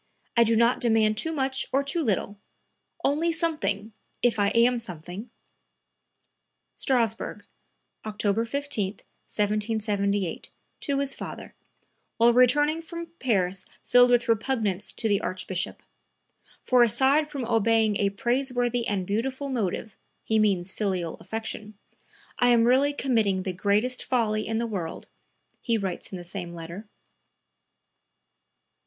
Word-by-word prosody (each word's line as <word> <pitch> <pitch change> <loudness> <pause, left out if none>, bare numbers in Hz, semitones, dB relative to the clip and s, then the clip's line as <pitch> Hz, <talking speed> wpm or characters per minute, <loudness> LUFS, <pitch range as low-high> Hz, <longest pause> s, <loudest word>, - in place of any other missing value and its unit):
I 235 - +6
do 230 0 +2
not 235 +2 +3
demand 220 -3 +3
too 320 +9 +1
much 265 -3 0
or 275 +2 +2
too 280 +5 -1
little; 205 -5 -1 0.6
only 315 +4 +2
something, 305 - -1 0.3
if 240 -3 +2
I 200 - +3
am 235 +3 +3
something." 180 +2 -7 1.5
(Strassburg, 230 -4 -1 0.6
October 210 0 0
15, 235 -6 -2
1778, 205 -3 -2 0.3
to 280 -1 -1
his 275 0 +1
father, - - -8 0.6
while 235 +1 +5
returning 295 +6 +4
from 335 0 -8
Paris 195 -6 0 0.2
filled 245 0 +6
with 240 -1 +3
repugnance 225 -4 0
to 225 - -2
the 200 -2 +2
Archbishop. 185 0 -4 0.8
"For 250 -1 +4
aside 270 +6 +3
from 280 -5 -4
obeying 225 -2 +2
a 200 0 +2
praiseworthy 245 +2 0
and 195 -3 -1
beautiful 260 +8 -2
motive" 220 -3 -2 0.3
(he 220 0 +1
means 195 -4 +1
filial 185 -6 -2
affection), 220 -1 -6 0.6
"I 245 - +4
am 240 -2 +5
really 260 +4 +4
committing 220 -9 +1
the 185 - -3
greatest 210 +7 0
folly 215 -4 0
in 225 0 -1
the 235 - 0
world," 185 -8 -5 0.5
he 230 -1 +1
writes 190 -4 -4
in 190 - -5
the 175 - -8
same 175 -1 -6
letter.) 170 +6 -8
225 Hz, 125 wpm, -26 LUFS, 200-255 Hz, 1.5 s, I